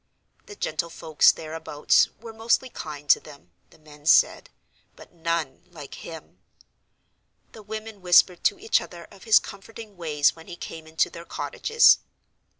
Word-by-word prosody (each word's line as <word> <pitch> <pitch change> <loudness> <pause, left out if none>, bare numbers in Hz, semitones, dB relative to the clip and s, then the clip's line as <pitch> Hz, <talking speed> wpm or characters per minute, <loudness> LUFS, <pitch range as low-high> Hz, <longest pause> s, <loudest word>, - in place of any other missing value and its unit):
The 415 - -10
gentlefolks 160 - +1
thereabouts 155 -2 0
were 225 0 -10
mostly 230 +3 0
kind 150 -8 -8
to - - +5
them 145 -2 -16 0.2
(the - - -21
men 150 -1 -15
said), - - +4 0.5
but - - -16
none 165 -5 -3
like 150 -5 -11
him. 165 -1 -11 1.1
The 220 - -13
women 215 0 -8
whispered 180 0 +4
to 405 - +3
each 435 +4 +1
other 170 -1 -10
of 200 +1 -16
his 220 -1 +6
comforting 210 0 -7
ways 150 -4 +1
when 165 0 -15
he 175 - -8
came 160 -2 -9
into 160 0 0
their 170 - -10
cottages. 460 - +3
170 Hz, 150 wpm, -24 LUFS, 155-215 Hz, 1.1 s, his